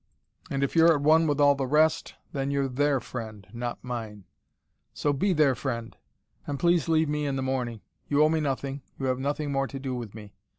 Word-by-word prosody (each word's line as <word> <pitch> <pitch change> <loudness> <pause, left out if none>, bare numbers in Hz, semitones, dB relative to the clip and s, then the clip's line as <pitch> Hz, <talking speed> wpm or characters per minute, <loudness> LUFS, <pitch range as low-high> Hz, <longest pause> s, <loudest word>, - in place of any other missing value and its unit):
And 140 0 -1
if 140 - -1
you're 165 0 +6
at 145 - -2
one 160 +2 +5
with 145 -1 0
all 145 -1 +6
the 135 -1 -2
rest, 155 +3 +2 0.2
then 135 -1 -2
you're 140 -1 0
THEIR 140 +1 +1
friend, 110 -5 -7
not 120 0 -5
mine. 110 -5 -6 0.7
So 145 - +1
be 190 +9 +1
their 155 -5 +4
friend. 115 -3 -4 0.5
And 140 -1 -3
please 170 -3 +2
leave 160 -1 +3
me 150 0 -1
in 140 - -1
the 135 - -2
morning. 125 -4 -2 0.3
You 145 +1 +3
owe 155 - +5
me 160 0 +1
nothing, 140 -1 -2 0.2
you 135 - -3
have 130 -1 0
nothing 145 +2 -2
more 135 0 0
to 135 - -7
do 135 -1 -4
with 115 -4 -6
me. 105 -2 -11
140 Hz, 215 wpm, -27 LUFS, 125-150 Hz, 0.7 s, you're